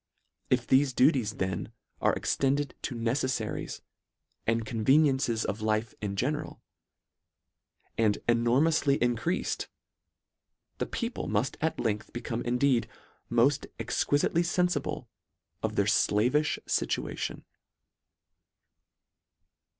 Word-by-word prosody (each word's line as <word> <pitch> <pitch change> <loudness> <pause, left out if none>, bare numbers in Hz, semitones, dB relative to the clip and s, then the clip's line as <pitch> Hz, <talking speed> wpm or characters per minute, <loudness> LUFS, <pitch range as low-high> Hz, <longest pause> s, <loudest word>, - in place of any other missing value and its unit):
If 125 -2 +2
thefe 130 -1 +3
duties 125 -5 +3
then 95 +1 -3 0.3
are - - +3
extended 140 0 0
to 125 - -4
neceifaries 120 0 -2 0.7
and 115 0 +1
conveniences 130 +1 +2
of 105 +3 -3
life 110 +1 0
in 100 -2 -3
general, 150 +8 -2 1.4
and 110 -2 +3
enor 120 +2 +3
moufly 155 -3 +3
increafed, 120 +9 0 1.1
the - - -1
people 235 0 -3
mufl: 105 +5 0
at 160 +1 0
length 105 -2 -2
become 120 0 -3
indeed 125 +1 +1 0.2
" - - -38
moft 135 +4 +3
exquilitely 145 +3 +1
fenfible 175 -3 0 0.6
of - - -2
their - - +2
flavifli 125 +9 +2
fituation." - - -2
125 Hz, 100 wpm, -29 LUFS, 115-145 Hz, 1.4 s, thefe